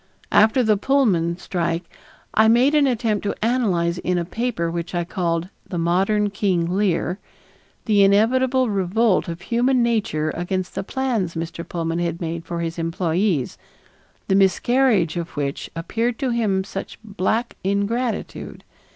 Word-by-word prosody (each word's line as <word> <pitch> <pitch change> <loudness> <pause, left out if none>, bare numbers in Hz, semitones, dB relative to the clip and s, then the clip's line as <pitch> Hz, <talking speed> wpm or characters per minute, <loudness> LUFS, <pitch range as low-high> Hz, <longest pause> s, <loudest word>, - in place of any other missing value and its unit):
After 225 +4 +5
the 215 -2 +3
Pullman 195 -10 +2
strike 170 -1 -2 0.5
I 220 +1 +5
made 245 +6 +4
an 295 -2 +4
attempt 225 -4 0
to 200 - -1
analyze 180 -8 +1
in 180 0 -1
a 170 - -1
paper 185 -4 -2
which 170 +1 -4
I 175 - 0
called 170 0 -2 0.2
The 180 - -3
Modern 195 +5 +1
King 190 -4 0
Lear 190 -1 0 0.7
the 210 -2 +4
inevitable 250 +6 +3
revolt 200 +1 +1
of 170 0 -6
human 245 +5 +2
nature 210 -10 0
against 180 +2 -3
the - - -2
plans 225 -8 -2
Mr. 165 +1 -4
Pullman 165 -1 -2
had 170 -1 -2
made 165 -1 -4
for 170 0 -4
his 165 0 -4
employees, 165 - -1 0.7
the - - +1
miscarriage 195 - +3
of 170 -2 -5
which 140 -1 -3
appeared 230 +8 -2
to 260 -2 -1
him 210 -5 +1
such 195 0 -7
black 220 +3 -1
ingratitude. 200 +4 -2
195 Hz, 145 wpm, -22 LUFS, 170-230 Hz, 0.7 s, After